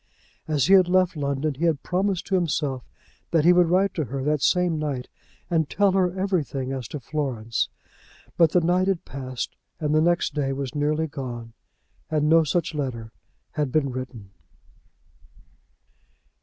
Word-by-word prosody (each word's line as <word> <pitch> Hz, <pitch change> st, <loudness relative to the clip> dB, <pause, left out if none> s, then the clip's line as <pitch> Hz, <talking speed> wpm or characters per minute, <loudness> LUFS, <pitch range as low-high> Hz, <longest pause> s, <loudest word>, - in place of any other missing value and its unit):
As 150 Hz, -4 st, +2 dB
he 195 Hz, -, +4 dB
had 185 Hz, -2 st, +6 dB
left 185 Hz, -1 st, +3 dB
London 140 Hz, 0 st, -1 dB
he 150 Hz, +6 st, -2 dB
had 160 Hz, -4 st, +1 dB
promised 185 Hz, 0 st, 0 dB
to 195 Hz, -, -5 dB
himself 150 Hz, -7 st, 0 dB, 0.5 s
that 165 Hz, -2 st, +2 dB
he 175 Hz, -, +7 dB
would 175 Hz, -1 st, +5 dB
write 190 Hz, +3 st, +3 dB
to 155 Hz, -, -2 dB
her 135 Hz, +1 st, -4 dB
that 150 Hz, 0 st, +1 dB
same 175 Hz, -2 st, +2 dB
night 140 Hz, -5 st, -3 dB, 0.4 s
and 160 Hz, -4 st, +1 dB
tell 200 Hz, -1 st, +3 dB
her 185 Hz, -1 st, +1 dB
everything 150 Hz, -9 st, -1 dB
as 130 Hz, -4 st, -4 dB
to 150 Hz, -, -6 dB
Florence; 125 Hz, -5 st, -2 dB, 0.7 s
but 165 Hz, -2 st, +5 dB
the 180 Hz, -, +3 dB
night 180 Hz, +3 st, +2 dB
had 195 Hz, -3 st, 0 dB
passed, 130 Hz, -2 st, -5 dB, 0.2 s
and 150 Hz, -1 st, 0 dB
the 155 Hz, -, +4 dB
next 175 Hz, +1 st, +2 dB
day 135 Hz, -3 st, -1 dB
was 135 Hz, -2 st, -4 dB
nearly 150 Hz, +2 st, 0 dB
gone, 120 Hz, -6 st, -6 dB, 0.6 s
and 150 Hz, -1 st, +1 dB
no 165 Hz, +1 st, +6 dB
such 165 Hz, +2 st, -1 dB
letter 125 Hz, -7 st, -4 dB, 0.4 s
had 150 Hz, -4 st, -2 dB
been 140 Hz, -2 st, +1 dB
written. 125 Hz, -6 st, -7 dB
150 Hz, 165 wpm, -24 LUFS, 135-175 Hz, 0.7 s, he